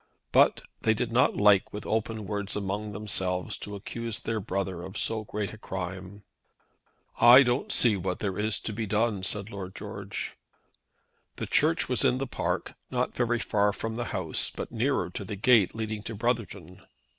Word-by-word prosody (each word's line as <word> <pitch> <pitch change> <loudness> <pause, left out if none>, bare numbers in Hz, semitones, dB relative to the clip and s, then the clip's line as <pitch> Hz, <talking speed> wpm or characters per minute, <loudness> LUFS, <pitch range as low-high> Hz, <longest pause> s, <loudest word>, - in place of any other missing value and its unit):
But - - +4 0.2
they 110 - +3
did 120 +1 -2
not 125 +2 +3
like 100 -2 +5
with 105 - -7
open 110 -1 -1
words 100 0 -3
among 105 +1 -3
themselves 95 -3 -1
to 105 - -6
accuse 115 +2 -4
their 115 -1 -2
brother 95 -2 -3
of 95 +3 -7
so 110 -1 0
great 105 0 -4
a 110 - -11
crime. 95 +1 -6 1.0
"I 125 +3 +9
don't 125 +1 0
see 115 -4 +4
what 90 0 -2
there 100 -2 -3
is 110 +1 +1
to 110 - -4
be 110 +1 -3
done," 105 0 +1
said 100 +3 -2
Lord 95 -2 -7
George. - - -6 1.0
The - - -4
Church 160 +2 +3
was 125 -2 +1
in 125 - +3
the 135 - -2
park, 125 - -2 0.2
not - - -1
very 120 -1 +1
far 105 -2 +2
from 110 +2 -4
the 120 +1 -3
house, 85 -8 0
but - - -7
nearer - - 0
to - - -5
the 105 - -5
gate 110 -1 +4
leading 110 -1 -3
to 115 +1 -6
Brotherton. 100 -6 -3
105 Hz, 180 wpm, -28 LUFS, 95-115 Hz, 1.0 s, I